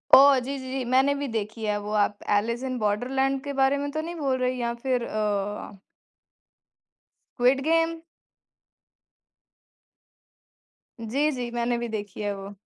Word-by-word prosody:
ओह! 275 0 +8
जी, 275 +3 -4
जी, 260 0 -7
जी, 265 -1 -2
मैंने 270 +2 +4
भी 285 0 -3
देखी 220 +1 -3
है 210 -1 +1
वो 205 +1 -6
आप 205 0 -2 0.2
ऐलिस 235 +4 -1
इन 255 -1 -2
बॉर्डरलैंड 260 +6 0
के 285 - -4
बारे 270 +1 +4
में 285 0 -2
तो 310 +2 -2
नहीं 340 +2 -6
बोल 275 -5 0
रहे 255 0 +1
हैं 255 - -5
या 235 -1 -1
फिर 255 -2 +1
अ 205 -2 -3 1.6
स्क्विड 255 +2 +4
गेम? 330 0 +2 3.0
जी, 270 +7 0
जी। 250 -3 -4
मैंने 240 0 0
भी 235 0 -3
देखी 205 -2 -5
है 205 -1 -1
वो। 195 +1 -9
250 Hz, 155 wpm, -26 LUFS, 215-275 Hz, 3.0 s, ओह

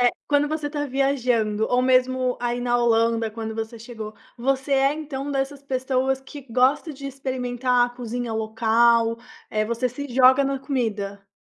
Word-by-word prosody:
eh, 245 0 +5 0.2
quando 290 0 +3
você 305 -1 -2
está 290 -1 -3
viajando 245 -6 +1
ou 250 0 +2
mesmo 255 0 +2
aí 240 0 -1
na 245 0 +1
Holanda 230 -1 +2
quando 220 0 -5
você 225 +1 -5
chegou 220 -2 -8 0.2
você 270 +2 0
é, 275 +1 +4
então, 285 -2 -5
dessas 275 0 -2
pessoas 260 0 0
que 280 +1 -10
gosta 270 +6 +2
de 275 0 -8
experimentar 250 -2 0
a - - -8
cozinha 245 -1 -4
local, 230 +1 +2 0.3
eh, 215 -1 0
você 235 +3 -1
se 285 +4 -6
joga 260 +2 +5
na 275 0 -1
comida? 210 -7 -3
250 Hz, 165 wpm, -24 LUFS, 230-270 Hz, 0.3 s, eh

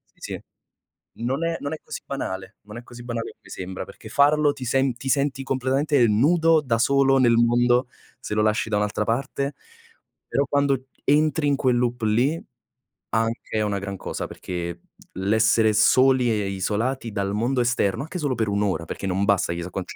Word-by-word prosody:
sì, - - -30
sì. - - -6 0.8
Non 130 +7 -1
è 165 0 -1
non 145 +2 -3
è 155 - -5
così - - -7
banale, 95 -8 -5
non 105 +2 -11
è 120 - -8
così 120 0 -12
banale 120 -1 -4
come - - -21
sembra, 95 0 -6
perché - - -13
farlo 145 +1 +4
ti 135 -3 -7
sen 130 0 +1
ti 135 +2 -6
senti 140 -1 +1
completamente 135 +1 +1
nudo, 160 +8 +4
da 120 -5 0
solo 135 +2 +3
nel 120 -3 +4
mondo, 120 +1 +3 0.3
se - - -5
lo 105 - +2
lasci 110 +1 +1
da 105 - +1
un'altra 105 0 0
parte. 135 +5 -2 0.7
Però, 140 +1 +1
quando 140 -2 +1 0.2
entri 150 0 +2
in 140 - +3
quel 130 -3 +1
loop 120 0 -1
lì, 120 +9 +2 0.7
anche 115 0 -1
è 110 - +2
una 105 -1 -1
gran 100 0 -5
cosa, - - -5
perché 85 -1 -6 0.3
l'essere 110 +3 +3
soli 130 +3 +4
e 105 -1 0
e 100 - -3
isolati 110 +6 -2
dal 100 -1 -2
mondo 120 +4 0
esterno, 120 -4 +1
anche 160 +4 -6
solo 145 -5 -1
per 110 -2 -1
1 100 0 0
ora, 95 -5 -1
perché 95 - -5
non 95 +1 0
bassa 100 -4 +2
chissà 85 +1 -5
quanti 95 0 -6
120 Hz, 190 wpm, -24 LUFS, 105-135 Hz, 0.8 s, farlo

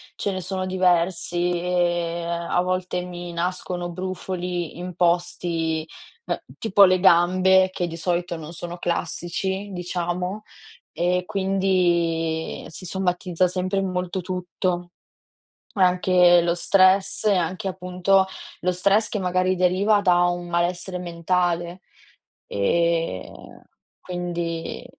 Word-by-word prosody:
Ce 200 - -2
ne 185 - -4
sono 185 +1 -3
diversi 180 -1 +1
e 175 -1 0
a 170 +1 -1
volte 185 0 -2
mi 175 -1 -7
nascono 175 0 -3
brufoli 180 -2 -4
in 180 +1 -6
posti 170 -2 0 0.4
beh, - - -3
tipo 205 -2 +4
le 185 -1 +5
gambe, 185 +1 +5
che 180 -2 -2
di 165 - -6
solito 175 +1 -1
non 160 -1 -8
sono 175 +1 -5
classici, 190 +3 -2
diciamo 180 +2 -3 0.5
e 180 +1 0
quindi 175 -4 0
si 165 - -10
somatizza 180 -1 0
sempre 185 +2 -1
molto 185 -1 -2
tutto. 180 -1 -3 0.9
Anche 180 -2 +4
lo 170 0 +1
stress 190 +3 +3
e 210 -2 +4
anche 185 +3 -2
appunto 185 +1 +1 0.3
lo 180 - +1
stress 200 +4 +3
che 210 - -3
magari 185 0 +1
deriva 190 +4 +3
da 180 -3 +4
un 175 0 -1
malessere 175 +2 -1
mentale. 175 0 -1 0.7
Ehm, 100 - -1 0.4
quindi 175 -2 -4
180 Hz, 115 wpm, -23 LUFS, 175-185 Hz, 0.9 s, le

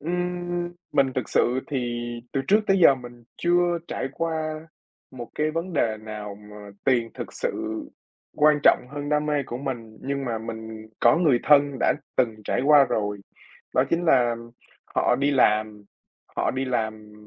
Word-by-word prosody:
Ừm, 175 +1 -2 0.2
mình 135 -1 +3
thực 130 - -2
sự 125 +2 +2
thì 120 -4 -2 0.4
từ 135 - 0
trước 210 +2 +5
tới 195 0 +3
giờ 165 -6 +7
mình 120 -2 -12
chưa 175 0 +2
trải 130 - -3
qua 160 -1 -3 0.4
một 120 -3 -8
cái 155 0 0
vấn 165 +4 -4
đề 115 -8 +1
nào 105 -2 -7
mà 105 0 -12
tiền 120 -3 +2
thực - - -7
sự 110 0 -3 0.5
quan 150 0 +5
trọng 125 - +5
hơn 145 0 -5
đam 150 0 +1
mê 150 -1 +1
của 120 - -5
mình, 120 -5 -6
nhưng 140 0 -3
mà 115 -3 -2
mình 110 -1 -7
có - - +5
người 150 -8 +3
thân 145 -2 +4
đã - - +3 0.2
từng 115 -3 +1
trải - - 0
qua 145 0 +7
rồi. 105 -4 -2 0.6
Đó 130 - +4
chính 170 +1 +1
là 120 -7 +4 0.6
họ - - +3
đi 140 +2 +1
làm 110 -5 +2 0.5
họ - - +1
đi 130 +1 -2
làm, 110 -4 -3
130 Hz, 170 wpm, -25 LUFS, 115-155 Hz, 0.6 s, giờ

